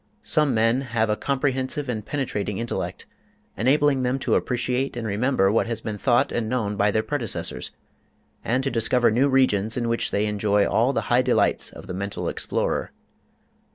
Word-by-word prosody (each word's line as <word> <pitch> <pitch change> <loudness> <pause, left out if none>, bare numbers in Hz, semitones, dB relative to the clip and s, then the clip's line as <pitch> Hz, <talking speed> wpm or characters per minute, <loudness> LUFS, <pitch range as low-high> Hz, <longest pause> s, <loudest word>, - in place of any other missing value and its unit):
Some 150 -5 +2
men 115 +4 +2
have 115 -4 0
a - - +2
comprehensive 135 +2 -1
and 110 -4 -3
penetrating 105 -7 -3
intellect, 115 0 -4 0.5
enabling 135 +4 +2
them 125 +1 0
to - - +1
appreciate 125 +1 -1
and 115 - -4
remember 105 -1 +1
what 115 - +1
has 115 -1 -2
been 105 -2 -5
thought 120 0 +2
and 115 -2 -2
known 110 -5 -1
by 100 +1 +2
their 110 +1 +1
predecessors, 130 -6 -2 0.7
and 125 +3 0
to 135 - -1
discover 120 +1 +2
new 130 +6 +3
regions 115 -5 +2
in 120 -1 -1
which 115 0 0
they 105 +1 0
enjoy 105 -1 +1
all 120 +4 +2
the 115 - -1
high 125 - +5
delights 125 -1 +1
of - - -12
the 95 - -6
mental 100 +2 -4
explorer. - - -2
120 Hz, 175 wpm, -24 LUFS, 105-130 Hz, 0.7 s, high